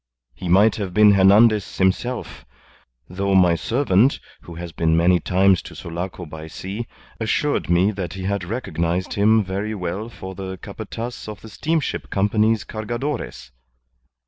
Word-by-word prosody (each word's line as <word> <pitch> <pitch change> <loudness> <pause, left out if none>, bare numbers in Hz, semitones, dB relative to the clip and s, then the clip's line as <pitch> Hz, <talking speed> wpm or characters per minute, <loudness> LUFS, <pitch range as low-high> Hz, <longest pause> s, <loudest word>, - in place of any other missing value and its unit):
He 85 +8 -6
might 100 +5 +5
have 95 -4 -4
been 105 -1 +7
Hernandez 100 +2 +4
himself; 105 +7 -1 0.6
though 100 +2 -1
my 90 -2 +5
servant, 115 - +2 0.2
who 85 - -11
has 85 0 -7
been 80 0 +1
many 90 +1 +4
times 95 +2 +3
to - - -11
Sulaco 90 +2 -6
by 80 0 -9
sea, 100 +8 -6 0.3
assured 145 +4 0
me 90 +4 +3
that 95 -5 -5
he 95 -1 -6
had 100 0 -1
recognized 90 -4 -2
him 110 +2 +4
very 100 +3 -3
well 95 +4 -4
for 95 -4 -8
the 95 0 -6
Capataz 115 +6 -7
of 105 -1 -8
the 110 - -11
Steamship 155 +7 -2
Company's 105 +2 +2
Cargadores. 110 - -5
95 Hz, 145 wpm, -22 LUFS, 90-110 Hz, 0.6 s, been